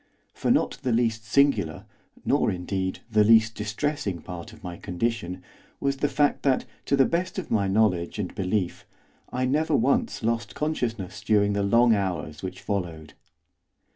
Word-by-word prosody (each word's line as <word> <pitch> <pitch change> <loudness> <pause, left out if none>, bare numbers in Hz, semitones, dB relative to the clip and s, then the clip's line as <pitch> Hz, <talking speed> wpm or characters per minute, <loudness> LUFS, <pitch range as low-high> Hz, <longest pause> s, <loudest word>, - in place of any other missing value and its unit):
For - - -2
not - - +2
the 125 - 0
least 115 -1 +1
singular, 105 - +2 0.4
nor, - - +2
indeed, 95 +1 -3
the 105 -1 +5
least 110 +1 +5
distressing 105 - -2
part 90 +5 -8
of 110 - -16
my 90 -2 -5
condition 90 -1 -3 0.4
was 140 0 0
the 145 - 0
fact 145 -1 +2
that, 135 -2 +2 0.2
to 140 - +3
the 135 -1 +5
best 175 +6 -1
of 190 - -5
my 100 -3 +2
knowledge 95 -4 +1
and 100 -4 -3
belief, 95 -1 -2 0.4
I 130 +1 0
never 150 +5 +1
once 240 - +1
lost 110 -3 -1
consciousness 115 - -2
during 105 -1 +3
the 100 - 0
long 115 +4 +4
hours 90 -7 -2
which 95 - -6
followed. 85 -7 -4
105 Hz, 160 wpm, -26 LUFS, 95-125 Hz, 0.4 s, the